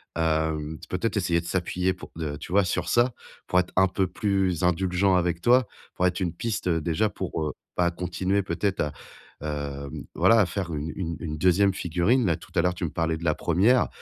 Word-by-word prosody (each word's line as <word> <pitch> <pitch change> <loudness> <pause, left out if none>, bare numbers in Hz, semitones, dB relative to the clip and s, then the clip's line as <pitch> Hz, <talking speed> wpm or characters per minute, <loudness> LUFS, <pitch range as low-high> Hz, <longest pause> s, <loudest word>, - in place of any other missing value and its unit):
hem, 80 -1 0
peut-être 105 +4 -1
essayer 85 -3 +1
de - - -13
s'appuyer 90 +1 0
pour, - - -11
heu, 75 -3 -3
tu 80 - -8
vois, 100 0 +5
sur 90 - -1
ça 120 +1 +3 0.3
pour 90 - +3
être 90 - -2
un 95 0 +5
peu 95 0 0
plus 95 -2 0
indulgent 90 +2 +2
avec 85 -1 0
toi, 125 +1 +4 0.3
pourrait 90 - +2
être 90 +1 -2
une 85 -3 -1
piste 105 0 -2
déjà 85 +5 +1
pour, 90 -5 -4
heu, 75 - -1 0.2
bah, 85 -1 +2
continuer 90 +3 -1
peut-être 95 +3 -1
à, 75 - -1 0.5
hem, 70 -2 -5
voilà 115 -3 +5
faire 90 -1 -4
une 75 +2 -3
une 85 -3 -3
une 75 -2 -4
2e 95 +3 +4
figurine. 90 +9 +1
Là, 85 -4 +2
tout - - -14
à - - +4
l'heure, 90 0 +1
tu 90 - -6
me 85 - 0
parlais 80 +1 -1
de 85 - -10
la 75 -3 +2
1re, 100 +10 +3
90 Hz, 205 wpm, -26 LUFS, 80-95 Hz, 0.5 s, vois